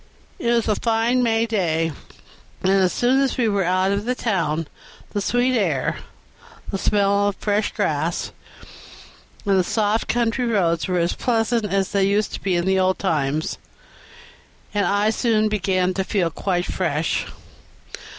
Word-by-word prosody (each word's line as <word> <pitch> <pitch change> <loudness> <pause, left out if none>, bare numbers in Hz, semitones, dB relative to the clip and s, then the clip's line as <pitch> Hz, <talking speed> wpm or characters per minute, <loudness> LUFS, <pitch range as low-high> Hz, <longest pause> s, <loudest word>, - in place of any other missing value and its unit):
It 235 - -1
was 235 -2 +1
a 215 - +3
fine 230 +3 +1
May 225 -1 +2
day, 165 -7 0 0.7
and 190 - +3
as 190 -2 +3
soon 255 +3 +2
as 275 - 0
we 240 -3 +2
were 200 -2 +1
out 185 +2 +1
of 200 +1 -1
the 250 +1 0
town, 165 -9 -1 0.4
the 205 - -2
sweet 245 +4 +1
air, 170 - 0 0.7
the 195 - -2
smell 200 0 +2
of 205 - -1
the - - -18
fresh 205 0 +1
grass, - - -1 1.1
and 195 -2 +3
the - - +3
soft 215 +3 0
country 240 +1 0
roads 170 -7 +1
were 180 -1 0
as 170 0 +1
pleasant 230 -1 0
as 195 -1 0
they 200 -2 +2
used 205 +1 0
to - - -5
be 190 -2 0
in 175 0 0
the 190 0 +2
old 185 0 +2
times, 155 -4 -1 1.1
and 205 -1 +1
I 205 +2 +2
soon 220 -2 +1
began 185 -3 0
to 190 - -1
feel 185 -4 0
quite 180 +1 -1
fresh. 160 -3 -1
200 Hz, 165 wpm, -22 LUFS, 185-225 Hz, 1.1 s, a